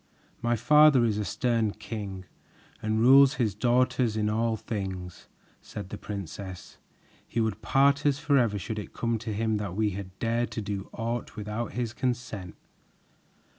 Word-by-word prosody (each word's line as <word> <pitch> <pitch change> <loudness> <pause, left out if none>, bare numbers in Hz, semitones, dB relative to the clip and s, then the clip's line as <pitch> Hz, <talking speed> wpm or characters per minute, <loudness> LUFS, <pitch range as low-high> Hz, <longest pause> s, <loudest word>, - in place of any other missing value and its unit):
"My 120 0 +1
father 150 0 +6
is 105 -2 0
a - - 0
stern 115 -6 0
king 100 -3 -6 0.6
and 110 0 0
rules 135 +3 +7
his 115 -7 0
daughters 120 +1 +2
in 105 0 +1
all 115 +1 0
things," 95 -5 -5 0.3
said 100 -3 -8
the - - -6
princess. 95 -1 -7 0.5
"He - - -2
would 110 -1 -1
part 140 +1 +3
us 140 -2 +2
forever 125 -8 +2
should 105 +3 -4
it 105 - -8
come 115 -1 -1
to 110 0 -5
him 110 +1 0
that 100 -4 -4
we 105 0 +1
had 95 -1 -7
dared 115 +1 0
to 110 - -3
do 100 -1 -4
aught 115 +1 -4
without 105 +2 -4
his 120 -2 -2
consent. 120 -8 -3
110 Hz, 160 wpm, -28 LUFS, 105-120 Hz, 0.6 s, rules